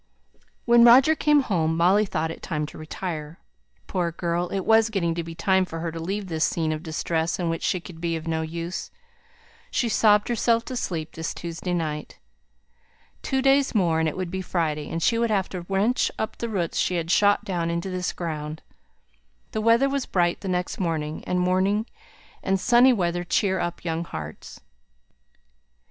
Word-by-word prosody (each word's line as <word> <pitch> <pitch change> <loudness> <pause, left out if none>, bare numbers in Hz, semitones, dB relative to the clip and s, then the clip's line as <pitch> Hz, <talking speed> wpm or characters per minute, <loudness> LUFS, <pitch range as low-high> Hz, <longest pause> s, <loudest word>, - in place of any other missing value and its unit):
When 235 0 +6
Roger 255 +6 +7
came 300 -2 +3
home, 165 -9 0
Molly 190 +5 +4
thought 160 -3 -2
it - - -9
time 150 -4 -2
to 150 - -11
retire. 155 0 -5 0.5
Poor 175 -3 -1
girl! 170 +1 -2
it 195 - -2
was 225 0 +5
getting 175 -6 0
to 170 0 -3
be 165 0 -8
time 190 +2 +2
for 165 -3 -6
her 165 0 -3
to 165 - -6
leave 195 +5 -3
this 160 -3 -1
scene 160 -2 0
of 155 0 -3
distress 160 0 -1
in 175 -2 -1
which 165 - -3
she 185 - 0
could 170 -1 -12
be 170 -1 -1
of 160 0 -6
no 160 -1 0
use. 170 +3 -5 0.8
She 240 - 0
sobbed 210 -1 +4
herself 230 0 +1
to 255 - -5
sleep 165 -9 -3
this 165 0 -5
Tuesday 170 +1 -4
night. 155 -3 -4 1.0
Two 265 -1 -1
days 275 -1 +3
more, 170 -6 +2
and 160 -1 +2
it 155 - -8
would 185 -2 -3
be 190 0 -3
Friday; 155 -5 -2
and 165 - -3
she 230 - +2
would 235 0 +1
have 195 -3 0
to 175 -2 -7
wrench 205 +6 +2
up 220 0 -3
the 235 - -4
roots 180 -6 -1
she 180 - +1
had 165 0 -1
shot 205 +1 +3
down 175 -3 -1
into 170 +3 -2
this 180 0 -2
ground. 155 -2 -5 0.9
The 220 - -2
weather 230 +4 +4
was 275 -1 -2
bright 175 -2 +1
the 200 - -6
next 180 -1 -2
morning; 160 -4 -2
and 180 - 0
morning 190 +4 +1 0.6
and 190 0 0
sunny 245 +5 +5
weather 175 -6 0
cheer 190 +2 +1
up 175 0 -4
young 165 0 -1
hearts. 80 - -8
180 Hz, 190 wpm, -25 LUFS, 165-205 Hz, 1.0 s, Roger